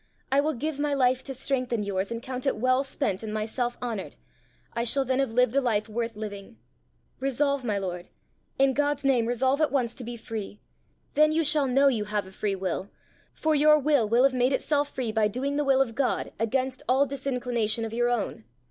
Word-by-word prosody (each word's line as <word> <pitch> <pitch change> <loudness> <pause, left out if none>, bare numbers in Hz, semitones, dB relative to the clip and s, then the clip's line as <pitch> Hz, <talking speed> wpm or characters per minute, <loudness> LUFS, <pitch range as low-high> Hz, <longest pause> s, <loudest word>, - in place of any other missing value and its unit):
I 275 +1 +4
will 305 0 -1
give 295 +3 -3
my 290 -1 0
life 255 -1 +2
to 270 - -5
strengthen 250 -4 -1
yours, 195 -1 -2
and 230 0 -5
count 255 +1 -4
it - - +2
well 255 +3 +2
spent 265 -8 -2
and 220 -1 -5
myself 225 +3 -2
honoured: 225 -6 -4 0.6
I 235 - -1
shall 270 +3 +2
then 260 +1 0
have 270 -4 +1
lived 250 +1 +2
a 275 - +4
life 220 -4 0
worth 230 +1 -3
living! 210 +1 -7 0.6
Resolve, 275 +1 0
my 215 -4 -1
lord 180 -2 -4 0.5
in 270 0 +4
God's 290 0 0
name 250 -4 +3
resolve 260 +4 +1
at 310 - +2
once 250 -4 0
to 250 - -9
be 240 0 -6
free. 220 -2 -6 0.5
Then 305 +1 +4
you 325 +1 +2
shall 300 -2 +3
know 270 +2 +4
you 230 -6 +1
have 210 -1 -2
a 190 - -12
free 200 +1 -2
will, 190 +1 -3 0.4
for 315 0 0
your 300 +1 +6
will 285 -7 +2
will 235 +3 +4
have 270 -1 +4
made 255 +1 +2
itself 290 +1 +1
free 245 -4 -3
by 215 -1 +2
doing 265 +6 -2
the 295 - +1
will 270 -1 +4
of 235 -4 -9
God 255 +1 -1
against 255 +3 -1
all 265 +2 +4
disinclination 250 -5 -1
of 225 - -6
your 240 +1 +1
own. 230 - -2
250 Hz, 210 wpm, -27 LUFS, 225-275 Hz, 0.6 s, your